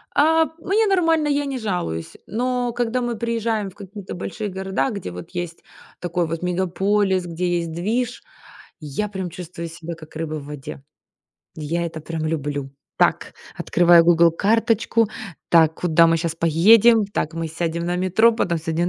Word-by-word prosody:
А, 320 +2 +4
мне 415 +6 +1
нормально, 330 -5 +2
я 290 0 +1
не 275 -2 -3
жалуюсь. 180 - -3
Но 245 +1 -1
когда 245 +1 -1
мы 240 -1 -2
приезжаем 225 -3 -1
в 185 - -18
какие-то 200 -1 -9
большие 205 +4 -5
города, 190 +5 -2
где 200 - -5
вот 90 0 -9
есть 175 -1 -5 0.4
такой 175 -1 -1
вот 165 +1 -4
мегаполис, 190 +1 0
где 175 +1 -1
есть 170 -1 -4
движ, 225 +9 -2 0.6
я 150 +7 -3
прям 190 -3 -4
чувствую 170 -1 -7
себя 165 0 -8
как 155 -1 -14
рыба 160 -1 -3
в 145 -2 -7
воде. 145 -1 -8 0.7
Я 165 +2 -2
это 160 -1 -7
прям 160 0 -5
люблю. 145 -3 -3 0.3
Так, - - +1 0.2
открываю 170 -1 +5
Google 170 0 +5
карточку. 225 +3 +2 0.4
Так, 160 -2 +5
куда 165 -1 +5
мы 165 0 +3
щас 165 -1 -2
поедем? 205 +8 +5
Так, 165 -5 -3
мы 165 0 -3
сядем 170 +1 -3
на 175 +1 -1
метро, 190 +6 +4
потом 170 -7 0
сядем 165 +2 -1
180 Hz, 160 wpm, -22 LUFS, 165-225 Hz, 0.7 s, открываю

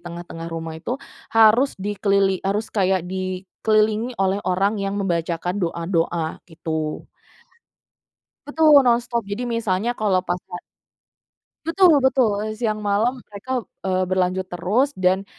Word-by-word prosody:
tengah-tengah 170 -1 -8
rumah 165 -1 -5
itu, 245 +9 -3 0.3
harus 225 +5 +4
dikelili 195 -1 +1
harus 205 +3 -2
kayak 190 -3 +1
di 185 0 -4 0.2
kelilingi 220 +2 +1
oleh 195 +1 +1
orang 200 +3 +1
yang 195 0 -2
membacakan 175 0 -2
doa-doa, 170 -1 -1
gitu. 160 -2 -4 1.4
Betul 295 -2 +5
nonstop, 235 -1 +1
jadi 205 +5 -4
misalnya 230 0 -1
kalau 200 -4 +2
pas 180 -1 -2 0.2
ha - - -3 1.1
Betul 335 0 +5
betul, 220 -6 +2 0.2
siang 215 -2 0
malam 225 +5 0
mereka, 235 +4 -4 0.2
eee, 185 0 +1
berlanjut 185 0 0
terus 205 +11 +1
dan, 185 -2 +1
195 Hz, 120 wpm, -22 LUFS, 180-230 Hz, 1.4 s, Betul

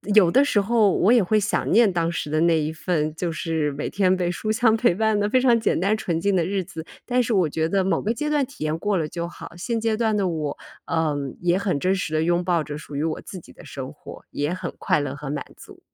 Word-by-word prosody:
有 185 -6 +6
的 270 - +5
时 285 -7 +2
候 215 -1 +3
我 195 - +3
也 240 -4 +5
会 215 +4 +2
想 205 +1 -1
念 220 0 +5
当 170 -1 0
时 165 - -4
的 155 0 +1
那 165 -1 +4
一 155 +1 -2
份， 155 -2 -1
就 170 +1 -2
是 160 -2 -1
每 145 - -4
天 185 -2 +2
被 180 -1 0
书 215 +5 -3
香 225 0 +3
陪 225 -4 +3
伴 220 +1 +1
的 205 0 0
非 255 - +3
常 245 -2 +4
简 220 - +1
单 200 +5 +2
纯 170 -6 -2
净 200 +3 +1
的 175 - +2
日 195 +1 -1
子， 160 -2 -9 0.2
但 250 0 +2
是 235 - -1
我 185 -4 +3
觉 160 +2 -1
得 195 +1 +2
某 190 - +1
个 220 - 0
阶 300 +6 -2
段 295 -2 +2
体 265 - -9
验 155 +1 -1
过 205 0 0
了 160 -3 -1
就 170 +2 -4
好。 - - -10
现 230 +6 -2
阶 225 -1 0
段 220 -1 +1
的 195 -2 +1
我， 155 -4 -3 0.3
呃， 160 -2 0 0.3
也 175 +1 +2
很 185 -7 -1
真 185 +5 +1
实 185 -4 -3
地 155 0 +2
拥 175 +1 +1
抱 175 -3 +1
着 150 0 -6
属 150 -1 -10
于 145 - -1
我 160 -1 -2
自 185 - -9
己 - - -16
的 - - -15
生 135 0 -7
活， - - -12
也 145 +4 -2
很 185 - -5
快 - - +2
乐 145 -2 -3
和 145 -1 -7
满 145 +1 -3
足。 - - -14
180 Hz, 295 characters per minute, -23 LUFS, 160-215 Hz, 0.3 s, 有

